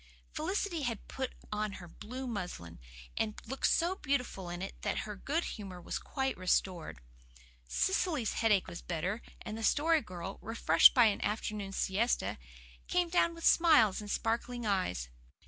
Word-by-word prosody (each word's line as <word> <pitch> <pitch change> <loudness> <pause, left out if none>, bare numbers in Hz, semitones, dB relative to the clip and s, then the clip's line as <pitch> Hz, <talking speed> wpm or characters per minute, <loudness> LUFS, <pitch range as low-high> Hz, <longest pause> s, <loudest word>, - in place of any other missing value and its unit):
Felicity 345 +1 -1
had 235 -6 -3
put 260 -1 -4 0.2
on 210 -1 -1
her 175 -2 -9
blue 250 +9 -7
muslin, 175 - -5 0.4
and 215 -1 -1
looked 270 +4 0
so 340 +2 +2
beautiful 250 - -2
in 175 +1 -4
it 195 - -5
that - - -1
her 210 -1 -6
good 300 - -1
humour 195 -4 -6
was 175 - -4
quite 265 -1 -2
restored. 180 - 0 0.7
Cecily's 320 - +1
headache 210 -4 +3
was 175 -1 -7
better, 180 +6 -2 0.2
and 215 - -5
the 225 - -5
Story 315 +6 +3
Girl, 185 -1 -7
refreshed 220 -7 +6
by 245 -3 +7
an 210 -2 +2
afternoon 210 -1 -2
siesta, 195 - 0 0.5
came 355 -1 +1
down 335 -1 +2
with 335 - -6
smiles 295 - +5
and 205 - -8
sparkling 235 +2 -1
eyes. 185 - 0
220 Hz, 155 wpm, -32 LUFS, 190-270 Hz, 0.7 s, by